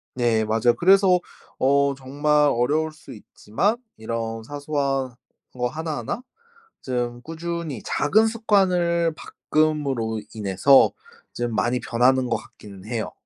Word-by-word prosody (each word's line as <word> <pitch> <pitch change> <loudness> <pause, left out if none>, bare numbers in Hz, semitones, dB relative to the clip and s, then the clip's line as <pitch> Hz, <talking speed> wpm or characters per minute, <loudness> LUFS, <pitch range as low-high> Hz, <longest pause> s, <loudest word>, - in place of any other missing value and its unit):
네. 115 -3 +1
맞아요. 115 +2 +2
그래서 190 0 +5 0.4
어 140 +1 +2
정말 145 +3 +1
어려울 150 +7 0
수 155 -1 -13
있지만 115 - -2 0.2
이런 115 0 -4
사소한 140 -1 -2 0.4
거 125 -1 -1
하나하나 155 - -4 0.6
좀 120 -2 -3
꾸준히 165 -4 -5
작은 215 +9 +2
습관을 180 -7 +1
바꿈으로 140 -10 -1
인해서 105 +6 +4 0.4
좀 120 -1 -3
많이 120 +3 +1
변하는 125 +2 +2
것 - - +1
같기는 100 -2 -14
해요. 110 -1 -3
135 Hz, 250 characters per minute, -23 LUFS, 120-160 Hz, 0.6 s, 그래서